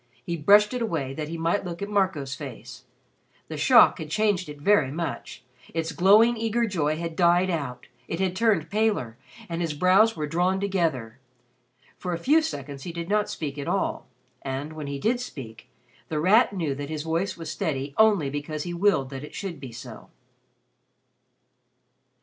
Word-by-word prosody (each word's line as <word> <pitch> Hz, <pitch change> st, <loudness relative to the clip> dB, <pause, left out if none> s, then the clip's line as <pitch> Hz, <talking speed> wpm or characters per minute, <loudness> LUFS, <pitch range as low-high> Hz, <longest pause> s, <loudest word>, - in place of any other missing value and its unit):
He 170 Hz, -, -2 dB
brushed 205 Hz, +8 st, +5 dB
it 250 Hz, -, -2 dB
away 155 Hz, -, -2 dB
that 150 Hz, +1 st, -4 dB
he 165 Hz, +2 st, -5 dB
might 165 Hz, +5 st, 0 dB
look 170 Hz, -2 st, -6 dB
at -, -, -3 dB
Marco's 190 Hz, -10 st, 0 dB
face. 140 Hz, -5 st, -9 dB, 0.6 s
The -, -, -5 dB
shock -, -, +6 dB
had 155 Hz, -, -6 dB
changed 200 Hz, -2 st, 0 dB
it 145 Hz, -1 st, -9 dB
very 155 Hz, -4 st, +3 dB
much. 165 Hz, -3 st, -5 dB, 0.3 s
Its 165 Hz, 0 st, -1 dB
glowing 205 Hz, +8 st, +5 dB
eager 230 Hz, +1 st, 0 dB
joy 155 Hz, -7 st, -1 dB
had 165 Hz, -1 st, -5 dB
died 175 Hz, +1 st, +3 dB
out, 130 Hz, -7 st, -4 dB, 0.2 s
it 165 Hz, -, -4 dB
had 185 Hz, -1 st, 0 dB
turned 200 Hz, -8 st, +1 dB
paler 205 Hz, -, 0 dB, 0.3 s
and 170 Hz, 0 st, -3 dB
his 160 Hz, -3 st, -2 dB
brows 190 Hz, +8 st, +4 dB
were 155 Hz, -2 st, -2 dB
drawn 180 Hz, +5 st, +1 dB
together. 160 Hz, -, -1 dB, 0.8 s
For 180 Hz, -1 st, -3 dB
a -, -, -1 dB
few 295 Hz, -, +3 dB
seconds 145 Hz, -, -5 dB
he 170 Hz, -, -6 dB
did 170 Hz, +1 st, -6 dB
not 210 Hz, 0 st, +1 dB
speak 145 Hz, -2 st, -5 dB
at 140 Hz, -, -5 dB
all, 190 Hz, +2 st, -1 dB, 0.3 s
and, 135 Hz, +3 st, -4 dB
when 155 Hz, -2 st, -6 dB
he 140 Hz, 0 st, -4 dB
did 230 Hz, -, 0 dB
speak, 125 Hz, -, -9 dB, 0.4 s
The 155 Hz, -, -2 dB
Rat 210 Hz, +8 st, +4 dB
knew 165 Hz, -8 st, -2 dB
that 140 Hz, +1 st, -6 dB
his 155 Hz, -1 st, -4 dB
voice 170 Hz, +4 st, -1 dB
was 165 Hz, -2 st, -6 dB
steady 140 Hz, -7 st, -3 dB
only 205 Hz, -10 st, +4 dB
because 150 Hz, +1 st, -4 dB
he 175 Hz, -, -5 dB
willed 170 Hz, -7 st, +1 dB
that 135 Hz, 0 st, -6 dB
it 150 Hz, -, -10 dB
should 190 Hz, -7 st, -5 dB
be 130 Hz, -3 st, -8 dB
so. 120 Hz, +2 st, -10 dB
165 Hz, 180 wpm, -25 LUFS, 145-200 Hz, 0.8 s, shock